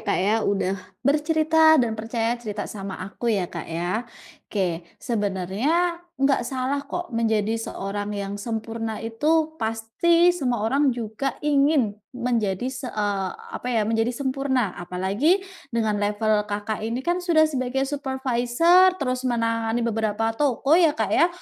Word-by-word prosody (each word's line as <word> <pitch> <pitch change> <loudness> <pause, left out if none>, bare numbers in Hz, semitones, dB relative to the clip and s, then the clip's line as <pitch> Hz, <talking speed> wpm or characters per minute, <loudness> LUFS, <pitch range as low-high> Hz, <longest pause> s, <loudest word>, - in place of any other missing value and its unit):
Kak - - +1
ya, 210 +2 +3
udah 195 -2 0 0.3
bercerita 315 +2 +4
dan 240 -5 +2
percaya 225 +1 -1
cerita 210 -3 -4
sama 195 -2 -6
aku 235 +4 -4
ya, 200 -5 +2
Kak, - - -5
ya. 180 +8 -2 0.4
Oke, 180 -5 -1 0.2
sebenarnya 230 - 0 0.2
nggak 275 0 +3
salah 265 +2 -1
kok 350 -4 -5
menjadi 220 -2 +1
seorang 205 -1 -4
yang 200 0 -4
sempurna 225 0 -4
itu 310 +7 +1
pasti 335 +11 +3
semua 250 -10 -1
orang 275 +5 +2
juga 230 +4 -3
ingin 280 -6 +3 0.2
menjadi 235 -5 0
se 255 0 -6
eee, 205 -3 -1 0.3
apa 250 - -5
ya, 225 -4 +1
menjadi 225 +2 +1
sempurna. 265 -6 0
Apalagi 200 - +1 0.2
dengan 220 -4 0
level 210 +1 +1 0.2
Kakak, 205 +1 -3
ini 230 +4 -3
kan 350 +1 +1
sudah 330 -3 +4
sebagai 265 -2 -1
supervisor, 275 +6 +3
terus 255 -3 -1
menangani 230 0 0
beberapa 225 0 0
toko 275 +2 +1
ya, 330 -3 +5
Kak, 215 -3 -1
ya? 335 - +5
235 Hz, 140 wpm, -24 LUFS, 215-280 Hz, 0.4 s, ya